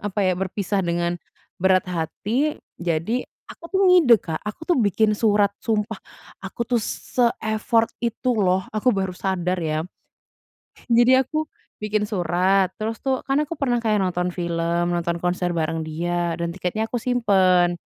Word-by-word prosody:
apa 205 +1 -2
ya, 185 - +3
berpisah 195 +1 -1
dengan 175 0 -1 0.4
berat 185 0 +3
hati. 205 - -1 0.2
Jadi 175 +8 0 0.3
aku 335 - -11
tuh 385 - +2
ngide, 350 -10 +7
Kak, 160 -2 -4
aku 210 +9 -7
tuh 350 +1 +2
bikin 215 +1 +2
surat 205 -2 +2
sumpah 220 -1 -2 0.4
aku 195 +5 -4
tuh 240 -1 +1
se-effort 225 -1 0
itu 235 +2 -1
loh. 190 -4 +1
Aku 215 +3 0
baru 190 -1 -1
sadar 180 -1 -2
ya. 155 -1 -1 1.1
Jadi 240 +2 +6
aku 310 +4 -1 0.4
bikin 210 0 0
surat, 185 0 +1
terus 220 +1 -3
tuh 265 -2 0
kan 270 +1 +1
aku 300 +2 -4
pernah 245 -4 +1 0.2
nonton 180 -1 0
film, 170 0 -1
nonton 170 0 -1
konser 180 0 -1
bareng 160 0 -1
dia 170 +2 -2
dan 170 0 -3
tiketnya 190 +4 -2
aku - - -2
simpen. 190 -8 +3
195 Hz, 150 wpm, -23 LUFS, 175-230 Hz, 1.1 s, ngide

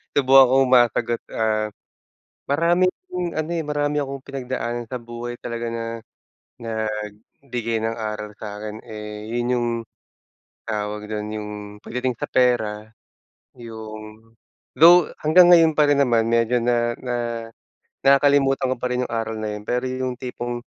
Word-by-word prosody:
Subukan 135 -1 +7
kong 135 0 +4
masagot. 120 -1 +3
Ah, 110 -1 0 0.8
maraming 170 +5 +3 0.5
ano, 155 +1 -2
eh, 165 - -1
marami 145 -1 -1
akong 135 -1 -6
pinagdaanan 125 -3 -4
sa 125 - -3
buhay 120 +1 -7
talaga 115 0 -4
na 115 0 -4 0.8
nagbigay 110 +2 -4
ng 110 +1 -1
aral 105 -1 -5
sa'kin, 105 0 -7
eh, 105 -1 -8
yun 120 0 -1
yung 120 0 0 1.0
tawag 105 -1 -3
dun, 105 0 -4
yung 105 -1 -5 0.3
pagdating 125 +2 -3
sa - - -3
pera, 110 -4 +1 0.7
yung 110 -1 -10 0.4
though 170 +1 +7 0.2
hanggang 175 +3 +7
ngayon 165 -2 +7
pa 150 -1 +3
rin 145 -1 +3
naman 115 -4 +3
medyo 115 +1 +2
na 120 0 +1
na 125 -1 -3 0.9
nakakalimutan 135 -1 +4
ko - - -9
pa 125 - -5
rin 125 0 -1
yung 120 - -7
aral 115 -1 -2
na 110 -1 -3
yun. 105 - -6
Pero 125 +1 0
yung 130 0 -2
tipong, 120 -1 -5
120 Hz, 140 wpm, -22 LUFS, 110-135 Hz, 1.0 s, Subukan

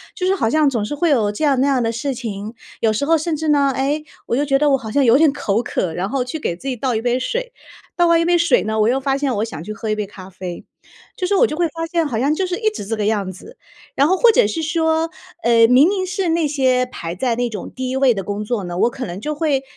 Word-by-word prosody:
就 370 -3 -1
是 385 - +3
好 290 - 0
像 310 -1 +3
总 230 -6 -2
是 255 - -4
会 325 +3 +1
有 225 -8 +2
这 210 - -5
样 280 -4 +3
那 265 - +3
样 270 -3 +2
的 225 -1 0
事 250 +4 -3
情。 220 -3 -6 0.3
有 220 -1 +2
时 250 +7 -1
候 330 0 +4
甚 315 +1 -2
至 315 +1 -4
呢， 285 -2 +3
哎， 285 +3 -1 0.2
我 - - 0
就 290 - +1
觉 275 -1 +2
得 300 0 +3
我 270 - +4
好 220 - -5
像 280 +4 +2
有 240 0 +5
点 310 -1 +5
口 230 -5 -1
渴， 175 -7 -2
然 185 +4 -3
后 270 0 0
去 250 +5 -4
给 175 - -2
自 265 - -9
己 260 - -1
倒 250 +1 -1
一 220 - -1
杯 245 +1 +1
水， - - -3 0.4
倒 350 - +3
完 335 0 +4
一 335 - +1
杯 350 0 +3
水 340 -6 +3
呢， 220 +1 -2
我 215 - +3
又 260 +2 +1
发 270 0 0
现 275 -2 -1
我 210 0 -1
想 160 -8 -8
去 215 - -7
喝 220 0 -5
一 215 - +1
杯 210 -1 -3
咖 190 -2 -12
啡。 185 -2 -8 0.5
就 365 - -2
是 400 - +1
我 480 +4 +4
就 305 - -4
会 345 +2 +1
发 330 +1 -5
现， 335 -1 0
好 240 -7 -2
像 280 +5 +1
就 380 - 0
是 360 -1 -3
一 440 -1 +2
直 425 - -7
这 225 +2 -3
个 210 - -1
样 205 -3 0
子。 440 - -14 0.4
然 275 - +4
后 375 - +3
或 475 - +6
者 - - +4
是 270 +10 -2
说， 320 0 0 0.3
呃， 230 -5 +5
明 255 +6 +6
明 380 -1 0
是 370 0 -2
那 330 -1 +1
些 260 -3 +2
排 170 -9 -6
在 235 +4 0
那 245 0 -1
种 210 -4 -7
第 260 0 -4
1 260 - -2
位 265 -2 +4
的 195 - -3
工 205 +2 -4
作 210 -3 -2
呢， 175 0 -5
我 230 - +3
可 255 +1 -6
能 180 +3 -7
就 300 +4 -2
会 295 -3 0
265 Hz, 320 characters per minute, -19 LUFS, 220-320 Hz, 0.5 s, 或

